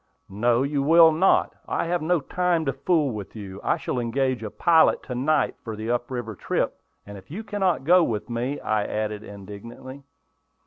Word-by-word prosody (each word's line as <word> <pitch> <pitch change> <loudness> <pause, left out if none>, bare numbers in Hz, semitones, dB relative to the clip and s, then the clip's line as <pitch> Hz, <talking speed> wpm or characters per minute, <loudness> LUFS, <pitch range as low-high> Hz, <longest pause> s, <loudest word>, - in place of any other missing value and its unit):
"No, 120 +5 +2
you 140 0 -1
will 165 +3 +7
not. 170 +5 +3
I - - -1
have 175 0 -1
no 165 +1 +1
time 175 +2 0
to 135 - 0
fool 145 +1 +1
with 105 -2 -7
you. 100 -2 -8
I - - +1
shall 125 - -3
engage 130 +1 -1
a 110 - -4
pilot 165 +8 +3
to 125 - -6
night 140 +5 +1
for 110 -2 -5
the 110 +2 -3
up 120 0 -1
river 120 -4 -4
trip, - - -2 0.2
if 100 -2 -11
you 195 +9 -6
cannot 190 -8 0
go 175 +4 +5
with 110 -8 -2
me," 125 +4 -3
I 105 -1 0
added, 105 0 -3
indignantly. 110 +7 -10
130 Hz, 185 wpm, -24 LUFS, 110-160 Hz, 0.2 s, will